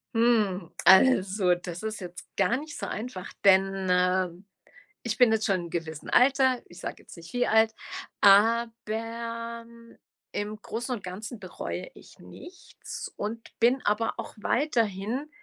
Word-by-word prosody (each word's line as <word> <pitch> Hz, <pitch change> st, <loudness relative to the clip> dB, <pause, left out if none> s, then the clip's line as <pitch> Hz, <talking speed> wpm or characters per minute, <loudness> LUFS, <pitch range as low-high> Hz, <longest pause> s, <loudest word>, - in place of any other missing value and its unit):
Hm. 210 Hz, -7 st, +2 dB
Also, 190 Hz, -4 st, +5 dB
das 175 Hz, +2 st, -7 dB
ist 215 Hz, -1 st, -4 dB
jetzt 180 Hz, -1 st, -9 dB
gar 240 Hz, -, +2 dB
nicht 300 Hz, +1 st, -8 dB
so -, -, -4 dB
einfach, 215 Hz, -5 st, -6 dB
denn, 195 Hz, -1 st, +4 dB
äh, 180 Hz, 0 st, +2 dB, 0.7 s
ich 235 Hz, -1 st, -2 dB
bin 245 Hz, -3 st, +6 dB
jetzt 220 Hz, 0 st, +1 dB
schon 195 Hz, -, +2 dB
in 180 Hz, -, -2 dB
'nem 170 Hz, -, -8 dB
gewissem 160 Hz, -2 st, -5 dB
Alter, 260 Hz, -1 st, +4 dB
ich 175 Hz, -, -14 dB
sage -, -, -7 dB
jetzt -, -, -14 dB
nicht 170 Hz, +4 st, -12 dB
wie 245 Hz, -, +1 dB
alt, 220 Hz, 0 st, +4 dB, 0.5 s
aber, 230 Hz, +2 st, +2 dB
hm, 230 Hz, 0 st, -17 dB, 0.4 s
im 210 Hz, +1 st, -4 dB
Großen 240 Hz, +3 st, -4 dB
und 205 Hz, -, -10 dB
Ganzen 210 Hz, +6 st, -7 dB
bereue 190 Hz, -, -6 dB
ich -, -, -17 dB
nichts 360 Hz, +1 st, -10 dB
und 225 Hz, +2 st, -5 dB
bin 245 Hz, +3 st, +3 dB
aber 210 Hz, +2 st, +1 dB
auch -, -, -6 dB
weiterhin, 230 Hz, +1 st, -1 dB
220 Hz, 150 wpm, -27 LUFS, 190-235 Hz, 0.7 s, bin